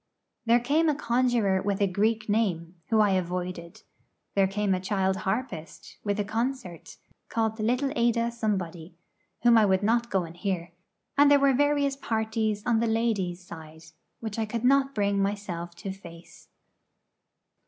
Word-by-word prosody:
There 235 Hz, +1 st, +5 dB
came 300 Hz, +7 st, +2 dB
a 300 Hz, -, +1 dB
conjuror 235 Hz, -7 st, +1 dB
with 200 Hz, 0 st, -1 dB
a 200 Hz, -, +3 dB
Greek 215 Hz, +3 st, 0 dB
name, 185 Hz, -6 st, 0 dB, 0.2 s
whom 220 Hz, -1 st, +4 dB
I 205 Hz, -2 st, +3 dB
avoided; 180 Hz, -2 st, -3 dB, 0.5 s
there 195 Hz, -1 st, +3 dB
came 200 Hz, 0 st, 0 dB
a 185 Hz, -, 0 dB
child 190 Hz, 0 st, 0 dB
harpist, 190 Hz, -7 st, -4 dB
with 205 Hz, 0 st, -1 dB
a -, -, +2 dB
concert, 225 Hz, -4 st, -4 dB, 0.3 s
called 225 Hz, -1 st, -1 dB
little 250 Hz, +5 st, 0 dB
Ada 235 Hz, 0 st, +1 dB
Somebody, 185 Hz, -7 st, -3 dB, 0.5 s
whom 235 Hz, -1 st, +6 dB
I 215 Hz, -, +5 dB
would 190 Hz, +1 st, +2 dB
not 235 Hz, +2 st, +1 dB
go 190 Hz, -2 st, +1 dB
and 165 Hz, 0 st, -9 dB
hear; 175 Hz, -2 st, -3 dB, 0.5 s
and 285 Hz, 0 st, +7 dB
there 285 Hz, 0 st, +6 dB
were 275 Hz, -1 st, +4 dB
various 285 Hz, 0 st, +2 dB
parties 220 Hz, -4 st, -2 dB
on 235 Hz, -2 st, +2 dB
the 230 Hz, -, +1 dB
'ladies' 205 Hz, -6 st, -1 dB
side,' 160 Hz, -1 st, -11 dB, 0.3 s
which 220 Hz, -1 st, -4 dB
I 220 Hz, -, +1 dB
could 230 Hz, +1 st, -4 dB
not 275 Hz, +1 st, +3 dB
bring 200 Hz, -1 st, +1 dB
myself 190 Hz, -4 st, -3 dB
to 190 Hz, +3 st, -6 dB
face. 170 Hz, -3 st, -13 dB
210 Hz, 160 wpm, -27 LUFS, 185-235 Hz, 0.5 s, and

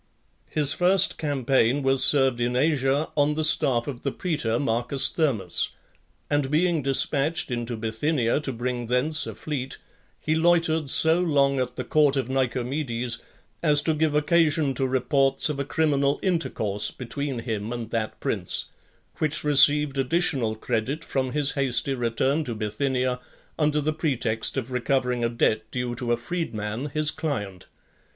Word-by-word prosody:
II. 155 Hz, -, -2 dB
His 145 Hz, -, +4 dB
first 185 Hz, +2 st, +4 dB
campaign 135 Hz, -2 st, +1 dB
was 135 Hz, 0 st, +3 dB
served 135 Hz, -4 st, +3 dB
in 120 Hz, +1 st, -1 dB
Asia, 140 Hz, +1 st, +1 dB
on 150 Hz, 0 st, +2 dB
the 155 Hz, -, -1 dB
staff 145 Hz, -6 st, +4 dB
of 135 Hz, -4 st, -7 dB
the 140 Hz, -, -2 dB
praetor, 150 Hz, -11 st, -2 dB
M. 130 Hz, +5 st, -1 dB, 0.2 s
Thermus; 135 Hz, -, +1 dB, 0.6 s
and 145 Hz, -2 st, 0 dB
being 165 Hz, +1 st, +1 dB
dispatched 140 Hz, +2 st, +1 dB
into 120 Hz, -1 st, -4 dB
Bithynia, 115 Hz, +4 st, -1 dB
to 150 Hz, -3 st, -4 dB
bring 120 Hz, 0 st, -4 dB
thence 140 Hz, +6 st, +1 dB
a -, -, -7 dB
fleet, 135 Hz, -4 st, -5 dB, 0.4 s
he 155 Hz, -, -1 dB
loitered 160 Hz, -2 st, +1 dB
so 160 Hz, +4 st, +4 dB
long 140 Hz, -6 st, +1 dB
at 125 Hz, -1 st, -3 dB
the -, -, -4 dB
court 145 Hz, -2 st, +2 dB
of 130 Hz, -2 st, -2 dB
Nicomedes, 125 Hz, -2 st, -1 dB, 0.4 s
as 150 Hz, -3 st, +5 dB
to 160 Hz, -, +1 dB
give 155 Hz, -1 st, 0 dB
occasion 150 Hz, -2 st, +2 dB
to 130 Hz, +1 st, 0 dB
reports 135 Hz, +3 st, +2 dB
of 145 Hz, -2 st, -4 dB
a -, -, 0 dB
criminal 145 Hz, -2 st, 0 dB
intercourse 110 Hz, -, -1 dB
between 135 Hz, +2 st, -5 dB
him 110 Hz, -2 st, -4 dB
and 115 Hz, -2 st, -6 dB
that 110 Hz, -1 st, -3 dB
prince; -, -, -1 dB, 0.5 s
which 155 Hz, -1 st, 0 dB
received 145 Hz, -1 st, +5 dB
additional 135 Hz, -5 st, 0 dB
credit 125 Hz, +8 st, -3 dB
from 130 Hz, -4 st, -3 dB
his 145 Hz, -1 st, +1 dB
hasty 135 Hz, 0 st, 0 dB
return 130 Hz, +5 st, 0 dB
to 120 Hz, -, -4 dB
Bithynia, 125 Hz, +4 st, -2 dB, 0.4 s
under 150 Hz, -1 st, +1 dB
the 155 Hz, +1 st, -1 dB
pretext 130 Hz, -8 st, -2 dB
of 130 Hz, -1 st, -4 dB
recovering 125 Hz, -1 st, -1 dB
a 115 Hz, -, +1 dB
debt 110 Hz, -2 st, 0 dB
due 125 Hz, -1 st, -3 dB
to 120 Hz, 0 st, -3 dB
a 120 Hz, -, +2 dB
freed 165 Hz, +2 st, -4 dB
man, 110 Hz, +6 st, -4 dB
his 155 Hz, +1 st, +1 dB
client. 105 Hz, -, -5 dB
135 Hz, 160 wpm, -24 LUFS, 120-150 Hz, 0.6 s, as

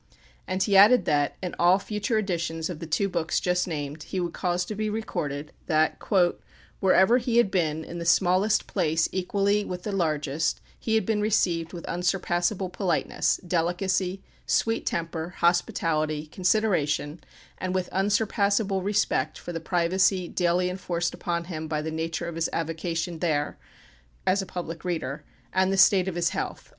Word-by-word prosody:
And 185 Hz, 0 st, 0 dB
he 200 Hz, -, +1 dB
added 210 Hz, +6 st, +7 dB
that, 145 Hz, -1 st, +1 dB
in 180 Hz, -, -3 dB
all 175 Hz, +2 st, +5 dB
future 210 Hz, +3 st, -2 dB
editions 170 Hz, -4 st, -2 dB
of 160 Hz, -, -7 dB
the 165 Hz, -, -6 dB
two 165 Hz, +6 st, +1 dB
books 170 Hz, -3 st, -1 dB
just 180 Hz, 0 st, 0 dB
named, 150 Hz, -2 st, -4 dB
he 185 Hz, -, -4 dB
would 175 Hz, -2 st, -2 dB
cause 180 Hz, -1 st, -1 dB
to 215 Hz, -, -5 dB
be 215 Hz, +1 st, -2 dB
recorded, 150 Hz, -9 st, -4 dB, 0.2 s
that, 155 Hz, 0 st, +2 dB, 0.8 s
"wherever 190 Hz, +5 st, +5 dB
he 235 Hz, -1 st, 0 dB
had 235 Hz, -5 st, +4 dB
been, 160 Hz, -4 st, 0 dB
in 170 Hz, +1 st, -7 dB
the 170 Hz, -, -4 dB
smallest 185 Hz, +4 st, +3 dB
place 160 Hz, -4 st, +1 dB
equally 200 Hz, +2 st, +1 dB
with 180 Hz, -2 st, -6 dB
the 210 Hz, -, -3 dB
largest, 155 Hz, -4 st, 0 dB, 0.2 s
he 220 Hz, -, 0 dB
had 220 Hz, -, +2 dB
been 215 Hz, -2 st, 0 dB
received 175 Hz, -6 st, +1 dB
with 175 Hz, -2 st, -8 dB
unsurpassable 180 Hz, +2 st, 0 dB
politeness, 180 Hz, -2 st, 0 dB
delicacy, 180 Hz, +2 st, 0 dB, 0.2 s
sweet 225 Hz, 0 st, +1 dB
temper, 170 Hz, +1 st, -3 dB
hospitality, 155 Hz, -3 st, +1 dB
consideration, 170 Hz, -4 st, 0 dB, 0.4 s
and 185 Hz, 0 st, -2 dB
with 185 Hz, -1 st, 0 dB
unsurpassable 200 Hz, 0 st, +1 dB
respect 205 Hz, +2 st, 0 dB
for 175 Hz, -, -7 dB
the 165 Hz, -, -3 dB
privacy 180 Hz, +2 st, +1 dB
daily 180 Hz, +1 st, +1 dB
enforced 175 Hz, -2 st, -2 dB
upon 170 Hz, -1 st, -2 dB
him 160 Hz, -3 st, -6 dB
by 155 Hz, -1 st, -1 dB
the 155 Hz, +1 st, -3 dB
nature 165 Hz, +2 st, -3 dB
of 170 Hz, -, -5 dB
his 165 Hz, 0 st, -1 dB
avocation 165 Hz, +1 st, -3 dB
there" 150 Hz, -4 st, 0 dB, 0.7 s
(as 195 Hz, +2 st, +3 dB
a 195 Hz, -, -7 dB
public 170 Hz, -3 st, -6 dB
reader), 155 Hz, -5 st, -3 dB, 0.3 s
"and 190 Hz, 0 st, +2 dB
the 195 Hz, -, 0 dB
state 190 Hz, -1 st, +5 dB
of 185 Hz, -, -3 dB
his 170 Hz, -1 st, +1 dB
health." -, -, -5 dB
180 Hz, 165 wpm, -26 LUFS, 165-195 Hz, 0.8 s, added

